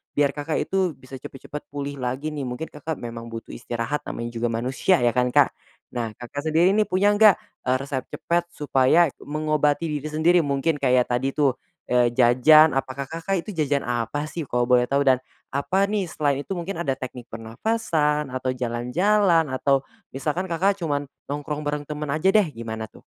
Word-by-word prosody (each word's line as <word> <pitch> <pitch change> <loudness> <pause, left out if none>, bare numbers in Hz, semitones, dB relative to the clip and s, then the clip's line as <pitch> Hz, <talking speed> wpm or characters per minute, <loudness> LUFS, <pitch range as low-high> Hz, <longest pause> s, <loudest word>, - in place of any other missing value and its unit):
biar 145 -1 +3
Kakak, 150 +2 -3
itu 185 -6 0
bisa 130 0 -11
cepet-cepet 140 +3 -9
pulih 140 -1 -5
lagi 130 +5 -3
nih 140 -4 -4
mungkin, 125 +6 -5
Kakak, 155 +1 -5
memang 115 -1 -7
butuh 115 0 -8
istirahat 120 +4 -3
namanya 115 0 -4
juga 120 0 -1
manusia 125 +7 +1
ya 120 - +4
kan, 125 +1 +2
Kak. - - +5 0.4
Nah, 115 -3 -3
Kakak 145 +5 -6
sendiri 165 +4 +4
nih 215 0 +3
punya 190 +3 +3
enggak, 205 -2 +6 0.3
eee, 130 - +3
resep 135 -2 -4
cepat 175 0 -1
supaya 145 +3 +3
mengobati 155 +1 0
diri 155 - -6
sendiri 165 +3 +3
mungkin 145 +2 0
kayak 125 -2 +4
tadi 130 +3 0
tuh, 140 -4 +2 0.3
eee, 125 -1 +4
jajan, 130 +6 +6
apakah, 135 +1 -2
Kakak 165 +4 -2
itu - - -8
jajan 145 -3 0
apa 120 +4 -2
sih, 170 - -4
kalo 120 0 +1
boleh 125 0 +3
tahu 140 +1 +2
dan 130 -1 +5 0.4
apa 185 +8 +1
nih 200 -4 -2
selain 145 -3 0
itu - - -14
mungkin 170 0 -4
ada 135 -4 -1
teknik 125 -2 -8
pernafasan 150 - -1
atau 130 0 -2
jalan-jalan 165 - +2
atau 135 0 +1 0.2
misalkan, 150 +7 -2
Kakak 190 +3 +1
cuman 145 -3 -1 0.2
nongkrong 145 +1 -3
bareng 145 0 -3
temen 150 -1 -5
aja 155 +6 +2
deh, 210 -5 +5
gimana 110 -4 -6
tuh? - - -18
145 Hz, 180 wpm, -24 LUFS, 125-160 Hz, 0.4 s, enggak